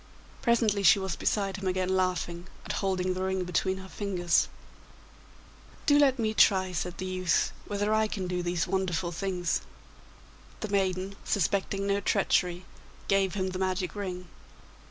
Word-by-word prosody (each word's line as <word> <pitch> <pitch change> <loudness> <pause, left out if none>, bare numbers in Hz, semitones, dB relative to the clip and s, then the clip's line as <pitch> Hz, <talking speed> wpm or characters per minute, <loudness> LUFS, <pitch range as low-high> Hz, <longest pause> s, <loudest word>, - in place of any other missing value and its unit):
Presently 225 -4 +2
she 195 0 +7
was 190 -3 -2
beside 195 -2 0
him 195 -1 -4
again 185 0 0
laughing, 180 -1 -1 0.2
and - - -4
holding 185 -2 0
the 185 - -4
ring 190 0 0
between 190 +2 0
her 190 0 -9
fingers. 180 -4 +1 1.4
'Do 290 -1 +5
let 275 -2 +4
me 220 -2 0
try,' 190 -3 +4
said 180 0 -3
the 185 - -4
youth, 185 -2 +1 0.2
'whether 205 +1 0
I 220 0 +3
can 195 -3 -4
do 180 0 -2
these 175 -1 0
wonderful 185 -2 -1
things.' 180 0 -1 1.0
The 215 - -3
maiden, 195 0 0
suspecting 195 +1 0
no 200 0 +1
treachery, 180 -3 +1 0.4
gave 195 -1 +2
him 190 -1 -1
the 185 0 -5
magic 185 -2 -1
ring. 180 -3 -5
190 Hz, 155 wpm, -29 LUFS, 180-200 Hz, 1.4 s, she